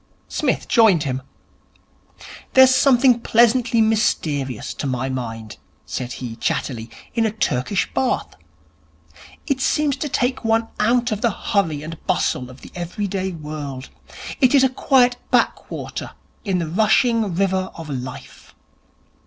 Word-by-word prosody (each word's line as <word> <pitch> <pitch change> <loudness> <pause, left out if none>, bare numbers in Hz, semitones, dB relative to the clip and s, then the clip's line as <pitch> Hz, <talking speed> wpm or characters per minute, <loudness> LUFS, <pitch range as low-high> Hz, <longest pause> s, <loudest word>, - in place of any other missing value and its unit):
Psmith - - -1
joined 210 - +4
him. 130 -2 -3 1.3
'There's 260 0 +8
something 255 -2 +4
pleasantly 235 0 +3
mysterious, 150 - 0
to - - -4
my 130 0 -2
mind,' 115 -4 -5 0.3
said 125 -1 -5
he 120 -3 -6
chattily, 115 -3 -2 0.2
'in 230 - +1
a 220 - +2
Turkish 190 - -1
Bath. 255 -1 -1 1.1
It 275 -3 -1
seems 295 -1 +1
to 295 - -3
take 255 0 -1
one 225 0 +1
out 240 +2 +2
of 215 -1 -2
the 235 - +3
hurry 165 -8 -1
and 165 +1 -8
bustle 130 -8 0
of 130 +1 -14
the - - -12
everyday 190 +2 -3
world. 150 -4 -7 0.5
It 260 0 +4
is 270 - +6
a 265 - +4
quiet 250 -1 +3
backwater - - -1 0.3
in 195 -5 0
the 170 -2 -2
rushing 215 +2 +2
river 190 0 0
of 165 -2 -8
Life. 130 -2 -8
195 Hz, 135 wpm, -21 LUFS, 145-240 Hz, 1.3 s, There's